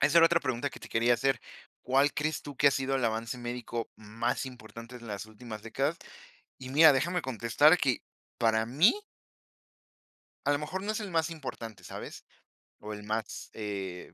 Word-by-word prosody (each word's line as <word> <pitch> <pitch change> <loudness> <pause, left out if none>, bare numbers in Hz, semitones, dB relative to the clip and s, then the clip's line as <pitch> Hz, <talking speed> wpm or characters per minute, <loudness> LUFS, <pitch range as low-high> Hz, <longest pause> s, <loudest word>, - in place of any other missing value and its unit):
esa 150 +4 +5
era 165 - +8
otra 170 0 +3
pregunta 130 0 -1
que - - -11
te - - -10
quería 120 +2 +3
hacer, 135 +2 +1 0.4
¿cuál 135 +2 +3
crees 155 +2 -1
tú 145 -2 -8
que 145 - +6
ha - - +3
sido 135 0 0
el 130 -3 +1
avance 115 +2 -1
médico 120 -1 -4
más 110 +4 -2
importante 115 -1 -10
en 120 -1 -11
las 100 -1 -5
últimas 110 0 -9
décadas? 135 +8 -1 0.6
Y 130 0 -8
mira, 155 +2 +8
déjame 175 +7 +1
contestar 130 - +4
que, 130 -5 +1 0.4
para 110 -1 +3
mí 150 - +5 1.5
a 145 - +4
lo 145 - +1
mejor 155 +6 -4
no 215 +2 -1
es 215 - -3
el 205 -3 -5
más 165 -1 +1
importante, 120 -8 -7
¿sabes?, - - -8 0.6
o 105 0 -6
el 105 - -8
más, 110 +1 -4
eh, 100 -4 -5
125 Hz, 185 wpm, -30 LUFS, 115-145 Hz, 1.5 s, era